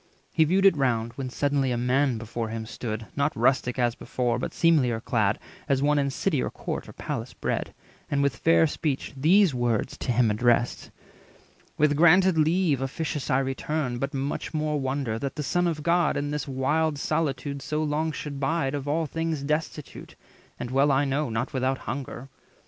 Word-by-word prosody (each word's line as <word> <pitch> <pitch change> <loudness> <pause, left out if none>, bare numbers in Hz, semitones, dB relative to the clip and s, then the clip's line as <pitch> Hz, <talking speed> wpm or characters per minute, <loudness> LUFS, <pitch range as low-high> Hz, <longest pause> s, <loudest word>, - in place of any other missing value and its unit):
He 160 - +4
viewed 190 +5 +2
it 195 - +7
round; 120 -5 0
When 130 +1 -5
suddenly 140 0 0
a 120 - 0
man 125 +1 +1
before 115 0 -4
him 110 0 -4
stood, 110 -1 -5
Not 140 +1 0
rustic 125 +1 +2
as 120 -2 +2
before, 125 0 -2
but - - -3
seemlier 140 -9 +3
clad, 110 -3 +1 0.3
As 135 0 +2
one 150 0 +3
in 140 -1 +1
city 145 +1 0
or - - -1
court - - -5
or - - -10
palace - - -5
bred, - - -1
300 - - -18 0.4
And 140 -1 +1
with 140 -2 +1
fair 165 0 +4
speech 150 -3 -2
these 170 +5 +4
words 120 -3 0
to - - -1
him 120 -2 +3
addressed:— 120 +2 +1 0.9
"With 150 -1 +3
granted 175 +3 +5
leave 160 -2 +2
officious 140 +1 -3
I 130 - +3
return, 135 -1 -2
But 135 +2 -2
much 140 +3 -3
more 150 -1 0
wonder 130 -4 -2
that 135 +2 -4
the 150 - -3
Son 175 +5 +1
of 155 -3 -2
God 170 0 +2
In 145 +1 -2
this 150 -1 -3
wild 145 +3 0
solitude 140 -2 -2
so 150 +3 -2
long 155 +1 0
should 145 -2 -6
bide, 140 0 0
Of 145 -1 -4
all 160 +3 +1
things 165 -1 -2
destitute, 150 0 -4 0.4
and, 125 - -5
well 140 +2 +3
I 135 +2 +3
know, 140 +1 0
Not 115 +2 -2
without 130 0 0
hunger. 130 0 -6
140 Hz, 190 wpm, -26 LUFS, 125-155 Hz, 0.9 s, it